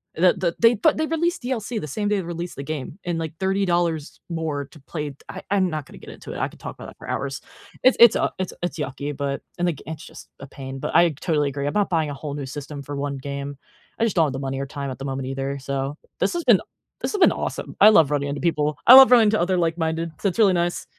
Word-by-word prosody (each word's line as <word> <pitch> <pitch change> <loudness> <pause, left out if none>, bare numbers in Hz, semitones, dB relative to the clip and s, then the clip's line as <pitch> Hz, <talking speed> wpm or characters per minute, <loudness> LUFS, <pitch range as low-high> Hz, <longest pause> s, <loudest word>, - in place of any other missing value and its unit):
The 180 +2 +4
the 180 -3 -1
they 230 +1 +6
pa 300 +8 +4
they 315 - -1
released 330 -1 -1
DLC 240 -3 -2
the 150 - -6
same 205 +8 -2
day 210 - +2
they 190 - -2
released 170 +1 -5
the 140 - -6
game 150 +1 -5
and, 170 -2 -1
like, 160 -1 -4
$30 175 -5 0
more 155 -4 -3
to 155 - -15
play 150 0 -5
t - - -16
I - - -7
I'm 190 -3 +3
not 155 -3 -4
gonna - - -14
get - - -12
into - - -9
it, - - -6
I - - 0
could - - -16
talk - - -7
about - - -10
it - - -15
for - - -12
hours. 135 -1 -3 0.4
It's 255 - +6
it's, 235 -2 +8
uh - - +1
it's 185 - -2
it's 175 -2 -3
yucky, 140 +1 -4
but 140 -1 -3 0.2
and 175 - +1
the 170 - +1
g 145 - -13
it's 160 0 -6
just - - -12
a 135 - -9
pain, 135 0 -8
but - - -4
I 170 0 +6
totally 150 0 0
agree, 140 +1 -3
I'm - - -2
not 205 -1 +1
buying 160 -3 +1
a - - -4
whole 145 0 -6
new 140 -2 -5
system 145 +1 -7
for 145 +1 -7
1 140 0 -3
game. 140 +1 -6 0.4
I - - +2
just 225 -4 +1
don't 165 - +4
have 140 - -2
the 135 - -4
money 135 0 -3
or 140 - -2
time 140 0 -5
at - - -7
the 135 - -7
moment 135 -1 -3
either. 135 +1 -3
So, 140 +2 -3 0.2
this 190 - +1
has 345 -1 -2
been - - +6
a - - -11 0.4
this - - -2
has 410 - -1
been 355 - +6
awesome. - - -4
I 210 - +9
love 160 -9 +5
running 140 -1 0
into 140 - -4
people. 150 -3 0
I 250 - +11
love 265 -1 +10
running 225 -4 +7
to 215 - +1
other 185 +2 +1
like-minded 165 -1 -1
so 200 - 0
it's 185 - -6
really 200 -3 +6
nice 175 0 -1
160 Hz, 285 wpm, -23 LUFS, 140-185 Hz, 0.4 s, I